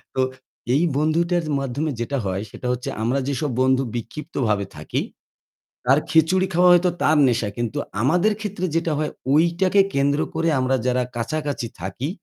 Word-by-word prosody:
তো 130 - +2 0.5
এই 150 - +3
বন্ধুটার 170 +3 +1 0.2
মাধ্যমে 140 +4 -2
যেটা 135 +4 -2
হয় 95 0 -2
সেটা 125 - -6
হচ্ছে 125 0 -3
আমরা 125 +4 +1
যেসব 140 0 -1
বন্ধু 130 0 +3
বিক্ষিপ্তভাবে 115 - -2
থাকি, 75 - -2 0.8
তার 135 +3 +5
খিচুড়ি 180 +4 +3
খাওয়া 180 +1 +5
হয়তো 175 +1 +4
তার 155 0 +4
নেশা। 115 -4 +1
কিন্তু 120 -2 -2 0.2
আমাদের 180 - +3
ক্ষেত্রে 200 -3 -3
যেটা 165 0 +1
হয় 155 -1 -1 0.2
ঐটাকে 175 +5 +4
কেন্দ্র 140 +1 +2 0.2
করে 165 +1 +1
আমরা 130 +1 +1
যারা 125 0 +2
কাছাকাছি 140 0 -2
থাকি 100 - -4
145 Hz, 150 wpm, -22 LUFS, 125-165 Hz, 0.8 s, তার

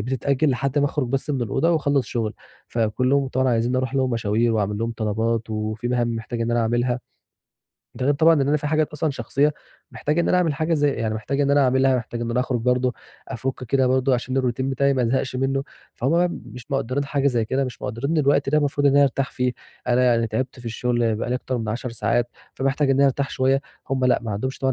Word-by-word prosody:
بتتأجِّل 135 +5 0
لحد 135 +3 0
ما 145 - +3
أخرُج 140 -3 -2
بس 135 +3 -1
من 135 -4 -1
الأوضة 135 +9 +1
واخلّص 145 -6 +1
شُغلي، 110 -3 -2 0.4
فكلّهم 125 +5 +1
طبعًا 130 0 +1
عايزيّني 120 +1 +1
أروح 130 +1 -1
لهم 130 -1 +1
مشاوير 115 0 +1
واعمل 105 -1 0
لهم 115 +1 -2
طلبات، 110 +1 -1
وفي 110 +2 -3
مهام 120 -2 0
محتاج 115 +1 -5
إن 115 - 0
أنا 120 0 +2
أعملها، 120 +2 0 0.9
ده - - -3
غير 145 - +3
طبعًا 160 +3 +5
إن 140 -2 +1
أنا 150 - +3
في 150 - -4
حاجات 155 0 +1
أصلًا 150 +1 -1
شخصيّة 145 +2 0 0.4
محتاج 150 +3 -1
إن 170 - +2
أنا - - +3
أعمل 165 -4 +1
حاجة 160 +4 0
زي 145 -1 +2
يعني 110 -4 -2
محتاج 135 +6 -2
إن 140 - +2
أنا 145 0 +4
أعملها 130 0 +3
محتاج 120 0 -5
إن 120 0 -2
أنا 125 +2 +1
أخرُج 125 -1 -1
برضه، 125 +1 +1 0.3
أفُكّ 130 +1 -4
كده 130 +2 +2
برضه 130 +1 +2
عشان 130 +2 -1
الroutine 125 -1 -2
بتاعي 135 +1 +1
ما 130 - +1
ازهقش 130 +2 0
منّه، 135 +1 0 0.3
فهم 130 - -1
بقى 175 +2 +3
مش 125 -4 -10
مقدّرين 135 0 -1
حاجة 140 0 0
زي 120 -5 +2
كده، 130 +5 0
مش 125 - -7
مقدّرين 125 +6 -3
إن 165 - +2
الوقت 140 -1 +2
ده 150 +2 +3
مفروض 145 0 +1
إن 140 - +5
أنا 145 - +7
أرتاح 135 -1 0
فيه، 125 -1 -1 0.4
أنا 125 +1 +3
يعني 115 -2 +3
تعبت 125 +4 -3
في 120 - -10
الشغل 120 0 0
بقى 110 - -3
لي 125 - +1
أكتر 125 0 -2
من 110 -2 -4
10 120 +3 -3
ساعات 115 +2 0 0.3
فمحتاج 135 +1 +1
إن 135 - +3
أنا 140 - +4
أرتاح 140 +1 0
شويّة، 135 +1 +2 0.3
هم 130 -1 +1
لأ 125 - +4
ما 115 - -4
عندهُمش 130 +6 -3
طبعًا 135 0 +1
130 Hz, 235 wpm, -23 LUFS, 120-140 Hz, 0.9 s, أنا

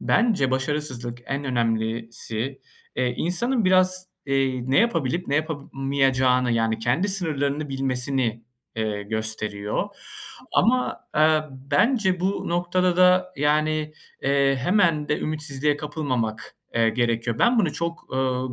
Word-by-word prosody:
bence 215 - +2
başarısızlık, 130 -3 -2
en 140 +1 -3
önemlisi, 115 +1 -2 0.4
eee, 125 -1 0
insanın 230 +7 0
biraz, 185 0 +3 0.2
eee, 130 -2 0
ne 135 - +4
yapabilip 175 - +1
ne 140 - 0
yapamayacağını 135 -4 +1
yani 115 -1 +1
kendi 130 - +1
sınırlarını 150 -6 -1
bilmesini, 130 -3 -1 0.3
eee, 105 -2 -2
gösteriyor. 110 - -3 0.6
Ama, 250 +5 +2 0.2
eee, 155 0 +4
bence 180 - +1
bu 195 +2 -1
noktada 175 +1 +1
da, 185 0 +4
yani, 155 +1 +1 0.3
eee, 140 0 +2
hemen 170 -6 +2
de 150 - +1
ümitsizliğe 150 -2 -1
kapılmamak, 130 -8 -3 0.2
eee, 115 -1 +3
gerekiyor. 115 0 -1
Ben 240 0 +4
bunu 175 -9 +2
çok, 170 0 -5
ııı, 130 -1 -1
140 Hz, 115 wpm, -24 LUFS, 125-170 Hz, 0.6 s, ne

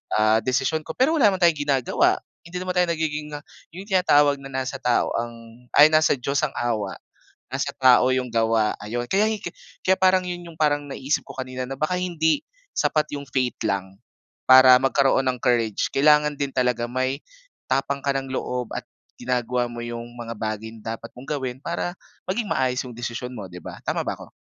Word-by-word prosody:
ah, 110 +1 +4
desisyon 130 +6 0
ko." - - -6
Pero 265 +5 +3
wala 240 - +6
naman 190 - -1
tayong 170 -3 +4
ginagawa. 135 -3 +2 0.3
Hindi 180 +1 -6
naman 185 0 -2
tayo 180 - +3
nagiging 150 -1 -3
ah, 145 - -8 0.3
yung 185 - -7
tinatawag 145 -8 +3
na 135 - -9
"Nasa 130 0 -3
tao 125 -2 +1
ang", 115 +1 -9
ay, 150 +1 +8
"nasa 155 -1 +4
Diyos 140 +2 -1
ang 140 - -15
awa, 110 -5 -2 0.5
nasa - - -2
tao 130 0 +6
'yung 130 -1 0
gawa." 115 -2 +1
'Ayun, 120 +3 -4
kaya 200 +2 +3
hiki 210 -5 -4 0.3
kaya 190 0 +2
parang 185 0 +4
yun 175 0 -5
yung 160 - -19
parang 145 -1 +2
naisip 140 +1 -2
ko - - -10
kanina 130 -1 -5
na 135 +1 -5
baka 155 +6 -1
hindi 175 - 0 0.3
sapat 150 -1 +1
yung 140 - -6
faith 130 -2 0
lang, 95 -2 -2 0.5
para 130 0 +9
magkaroon 135 0 +2
ng 125 -1 -2
courage. 115 -4 +1
Kailangan 150 +1 +4
din 140 -1 -1
talaga 125 -2 +1
may, 130 +3 -1 0.5
tapang 135 +1 0
ka 140 0 0
ng 135 -1 -4
loob 125 -2 -3
at - - -6 0.3
ginagawa 125 0 -1
mo 120 0 -7
yung 120 0 -6
mga 115 -1 -6
bagay 110 0 -4
na 115 0 -6
dapat - - -12
mong 135 +4 -5
gawin 130 -2 -4
para 170 +3 -3 0.3
maging 205 +3 -2
maayos 130 -1 0
yung 120 - -11
desisyon 120 +1 -5
mo 105 - -6
di 90 -1 -10
ba, - - -9
tama - - -1
ba - - -3
ako? - - -12
130 Hz, 195 wpm, -23 LUFS, 120-150 Hz, 0.5 s, para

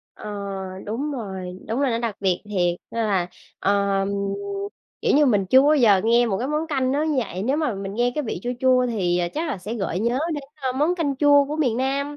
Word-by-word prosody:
Ờ, 210 - -8 0.6
đúng 275 +8 -3
rồi, 190 -6 -6
đúng 235 +5 -1
rồi, 275 -3 +2
nó 230 - 0
đặc 230 -3 -3
biệt 185 -3 0
thiệt! 180 -4 0
Nên 230 -1 -1
là, 190 -4 +1 0.3
ờ, 200 0 +2 1.0
kiểu - - +2
như 295 0 +5
mình 205 -6 +2
chưa 260 +6 +6
bao 300 +2 +5
giờ 215 -8 +5
nghe 235 +1 +4
một 195 -4 -1
cái 255 - -2
món 305 +2 -1
canh 265 -4 0
nó 290 +2 +1
như 305 -4 0
vậy. 195 -5 -3
Nếu 265 +6 +1
mà 300 -9 0
mình 195 0 -5
nghe 245 +2 +1
cái 300 -2 -2
vị 200 -5 -4
chua 245 - -2
chua 255 -1 +4
thì, 180 -7 0
ờ, 175 -1 0
chắc 320 +2 -2
là 270 - -3
sẽ 210 +6 -5
gợi 190 -4 -2
nhớ 235 +4 +1 0.2
đến, 290 - -4 0.2
ơ, 260 -2 -1
món 300 +7 +1
canh 295 -6 -1
chua 285 0 +5
của 295 +2 -4
miền 255 -8 +1
Nam. 280 +3 -1
240 Hz, 240 wpm, -23 LUFS, 200-280 Hz, 1.0 s, chưa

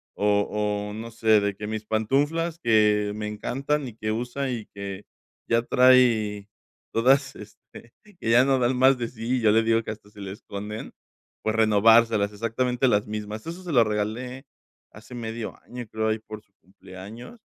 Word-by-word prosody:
o 105 0 +2 0.4
o - - -7
no 115 +2 -7
sé, 110 -1 +3
de 100 -1 -1
que: 105 +1 -6
"Mis 110 0 -4
pantuflas 145 +10 0
que 105 -5 +3
me 105 0 -4
encantan 135 +6 -2
y 115 - -10
que 110 -1 -3
usa 125 +4 -3
y 115 -4 -5
que 100 0 -7 0.4
ya 115 0 +2
trae 120 -6 +4 0.5
todas, 130 +5 +3
este, 115 - -14 0.3
que 115 - -3
ya 120 +2 +6
no 135 -1 +2
dan 125 +1 +1
más 130 +1 +5
de 120 -1 -3
sí", 115 +2 -3
y - - -2
yo 110 -2 +4
le 110 +1 +4
digo 115 0 +2
que - - -5
hasta 105 -1 -11
se 105 -1 -13
le 95 -1 -6
esconden, 105 0 -7 0.5
pues, 110 0 -1
renovárselas 110 -1 +4
exactamente 125 +4 0
las 105 -3 +2
mismas. 105 0 -5
Eso 170 +3 -7
se 175 - -5
lo 120 -3 +6
regalé 115 +5 -3 0.5
hace 110 +4 -14
medio 115 -1 -5
año, 125 0 -7
creo, 110 0 -1
ahí 110 0 0
por 110 0 -10
su 100 - -40
cumpleaños, 100 - -12
110 Hz, 180 wpm, -25 LUFS, 105-125 Hz, 0.5 s, ya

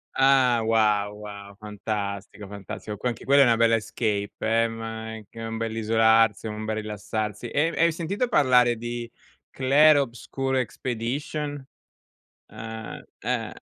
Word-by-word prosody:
Ah 130 -3 +4
wow, 105 -2 +2
wow, 100 -1 -10
fantastico, 100 -1 -5
fantastico, 100 +1 -7
qua 125 - -1
anche 115 - -6
quella 140 +1 +6
è - - +5
una 120 -2 +4
bella 115 0 +4
escape, 105 -2 -2
eh, 115 +1 +2
ma 115 0 -6
è 110 - -10
c - - -30
un 115 0 -5
bell'isolarsi, 115 0 +2
è - - -3
un 105 0 -5
bel 110 0 -2
rilassarsi. 105 +1 -4
E 150 +6 +1
e - - +2
hai 170 - +4
sentito 185 +9 -2
parlare 125 - +4
di 120 +1 -5 0.4
Clair 145 +3 +5
Obscur 135 0 -2
Expedition? 130 +4 -3 0.8
Ah, 110 0 -8 0.2
eh - - -2
115 Hz, 145 wpm, -25 LUFS, 105-130 Hz, 0.8 s, quella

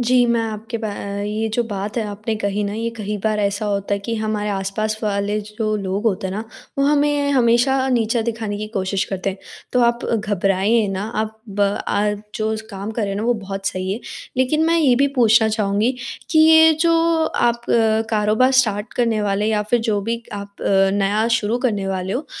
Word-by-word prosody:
जी, 245 0 +4
मैं 235 -1 +2
आपके 220 +2 -5
बा 220 - -3 0.3
ये 215 +2 -2
जो 240 - +2
बात 205 -1 -5
है - - +1
आपने 215 +2 -3
कही 200 0 -1
ना 200 - -3
ये 230 +1 -2
कही 210 -1 -3
बार 215 -1 +1
ऐसा 200 +1 -1
होता 200 0 -1
है 200 - -2
कि 230 - -1
हमारे 215 -1 -2
आस-पास 205 +2 -2
वाले 205 0 0
जो 215 +1 -3
लोग 195 +1 -3
होते 190 -2 0
हैं 190 - -4
ना 215 - -2 0.4
वो 275 - +3
हमें 290 0 +2
हमेशा 245 +1 +3
नीचा 235 -2 +1
दिखाने 220 -3 -3
की 215 - -4
कोशिश 195 -2 -1
करते 195 0 -2
हैं। 190 - -9 0.3
तो 250 - +3
आप 235 0 +1
घबराएँ 205 +1 +1
ना 190 - -3 0.2
आप 220 0 -5
बा 200 0 +1
आ 210 +1 0 0.2
जो 220 0 -1
स - - -5
काम 200 +2 -5
कर 225 0 -3
रहे 200 - -1
हैं 195 - -3
ना 210 - -2
वो 245 - +3
बहुत 195 -2 -6
सही 185 +1 -2
है। 225 - -4 0.4
लेकिन 280 +5 +2
मैं 335 0 +3
ये 275 -6 +4
भी 280 +2 +3
पूछना 225 -1 +5
चाहूँगी 215 +2 +1 0.4
कि 315 - +3
ये 320 0 +7
जो 335 0 +4 0.3
आप 235 0 0 0.5
कारोबार 215 +4 +3
स्टार्ट 210 0 -3
करने 230 -3 +1
वाले 205 +1 0
या 215 -1 +1
फ़िर 230 +3 +1
जो 215 -3 0
भी 230 +3 -3
आप 200 0 -8
अ, 195 0 +3
नया 205 +2 +1
शुरू 230 0 +1
करने 210 -6 -1
वाले 190 0 -2
हो 280 - -3
215 Hz, 210 wpm, -20 LUFS, 200-235 Hz, 0.5 s, ये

